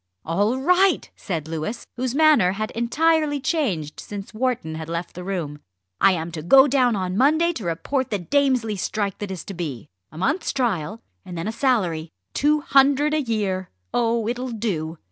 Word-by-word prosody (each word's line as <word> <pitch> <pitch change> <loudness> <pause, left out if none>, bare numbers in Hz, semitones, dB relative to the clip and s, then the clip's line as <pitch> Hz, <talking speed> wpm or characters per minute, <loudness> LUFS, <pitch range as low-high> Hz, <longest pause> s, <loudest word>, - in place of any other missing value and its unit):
"All 205 +9 +1
right!" 360 +8 +3
said 165 -6 -4
Louis, 165 +8 -4
whose 250 +1 -2
manner 290 - +5
had 215 +2 -3
entirely 295 +5 +1
changed 245 - -1
since 205 +1 -8
Wharton 230 -9 -1
had 160 0 -6
left 170 +1 -4
the 180 - -7
room. 170 -6 -4 0.4
"I 195 - +5
am 165 -1 -3
to 160 -2 -5
go 265 - +7
down 255 -4 +3
on 185 -2 -2
Monday 315 - +3
to 230 - -6
report 255 +11 -1
the 205 - 0
Damesley 250 - +1
strike 200 +1 -2
that 205 - -4
is 185 -4 -5
to 200 - -6
be. 150 - -5 0.3
A 155 - -12
month's 285 - 0
trial, 220 - -1 0.2
and 175 - -8
then 165 +4 -3
a - - -1
salary 190 - 0 0.2
two 300 +1 +2
hundred 285 +2 +4
a 310 - +2
year. 205 -7 -2 0.2
Oh! 230 -2 +1
it'll 250 +2 -2
do." 180 -9 -3
220 Hz, 180 wpm, -23 LUFS, 175-270 Hz, 0.4 s, go